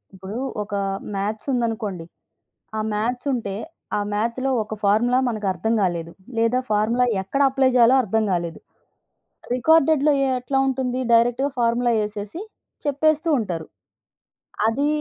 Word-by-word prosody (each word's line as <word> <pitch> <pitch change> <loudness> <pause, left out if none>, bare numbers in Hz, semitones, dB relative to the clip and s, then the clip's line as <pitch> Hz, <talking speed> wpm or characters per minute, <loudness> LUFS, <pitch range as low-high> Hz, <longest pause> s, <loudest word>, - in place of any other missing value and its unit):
ఇప్పుడు 190 +4 -7 0.3
ఒక 205 0 -10 0.4
మ్యాథ్స్ 210 +5 -3
ఉందనుకోండి, 220 -7 -2 0.7
ఆ - - 0
మ్యాథ్స్ 245 +5 -2
ఉంటే, 205 -5 -3 0.4
ఆ - - 0
మ్యాథ్‌లో 235 +5 -1
ఒక 215 - -6
ఫార్ములా 235 +5 +3
మనకు 215 -3 -3
అర్థం 220 +6 -1
కాలేదు, 170 -3 -1 0.3
లేదా 230 +2 +2
ఫార్ములా 220 +4 +2 0.2
ఎక్కడ 235 +9 -3
అప్లై 265 0 +3
చేయాలో 240 +1 +6
అర్థం 220 0 0
కాలేదు. 170 -2 -2 1.0
రికార్డెడ్‌లో 305 +2 +4
ఎ - - +1
ఎట్లా 260 +2 -2
ఉంటుంది, 255 -1 -1
డైరెక్ట్‌గా 245 +4 +3
ఫార్ములా 235 +1 +2
ఏసేసి 210 - -6 0.4
చెప్పేస్తూ 310 +3 +1
ఉంటారు. 175 -7 -4 1.0
అది 275 +6 +1
230 Hz, 125 wpm, -22 LUFS, 205-260 Hz, 1.0 s, చేయాలో